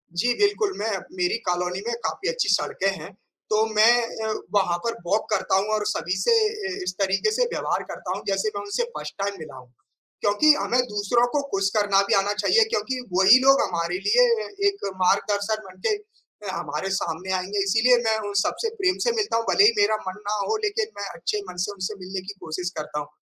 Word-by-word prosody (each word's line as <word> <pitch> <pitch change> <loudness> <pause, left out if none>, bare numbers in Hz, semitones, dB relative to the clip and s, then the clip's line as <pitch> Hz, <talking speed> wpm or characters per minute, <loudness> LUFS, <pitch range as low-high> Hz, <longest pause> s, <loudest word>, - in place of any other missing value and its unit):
जी, 245 +8 +2
बिल्कुल 410 0 +2
मैं 220 +2 -1 0.2
मेरी 360 -7 0
कॉलोनी 180 +1 -1
में 235 - -1
काफ़ी 390 +3 -2
अच्छी - - -1
सड़कें 195 - +1
हैं। 160 +5 -9 0.4
तो 215 +1 +3
मैं 230 +3 +5 0.2
अ, 220 - -1 0.2
वहाँ 185 -4 +2
पर 230 - 0
वॉक 205 +5 0
करता 195 -3 +1
हूँ 195 +2 0
और 210 -1 -2
सभी 170 +3 -1
से 190 - +3 0.5
इस 185 0 -3
तरीके 195 - +1
से - - +2
व्यवहार - - -1
करता - - -6
हूँ - - -9
जैसे 195 +2 0
मैं 200 - -3
उनसे 205 - -1
फर्स्ट - - -6
टाइम 200 0 -1
मिला 155 - -9
हूँ। 125 -1 -14 0.5
क्योंकि 205 +10 +5
हमें 250 -4 0
दूसरों 210 +4 +1
को 290 - +3
खुश 195 0 +1
करना 205 -2 +3
भी - - +3
आना 200 +1 +2
चाहिए 210 - +4
क्योंकि 260 - -2
वही 190 +7 +7
लोग 275 +1 +5
हमारे 170 0 -1
लिए - - +5 0.4
एक 400 0 -7 0.2
मार्गदर्शन 205 +3 +1
बनके 185 - -2
अ, 425 - -14
हमारे 155 +2 -4
सामने 175 +3 -4
आएँगे 190 +2 -1
इसीलिए 225 +5 +4
मैं 220 0 +2
उन - - -6
सबसे 455 - -2
प्रेम 370 -1 +2
से - - +4
मिलता 410 - -1
हूँ। 230 - -1
भले 400 - +6
ही 430 - +7
मेरा 410 - +3
मन 185 +2 -5
ना 210 - 0
हो, 440 - +1
लेकिन 420 +1 -1
मैं - - -3
अच्छे 425 - -2
मन - - -10
से - - -4
उनसे 200 +1 -4
मिलने 185 +1 -5
की 205 - -5
कोशिश 175 +3 -4
करता 150 -1 -4
हूँ। 145 - -6
205 Hz, 205 wpm, -24 LUFS, 190-260 Hz, 0.5 s, वही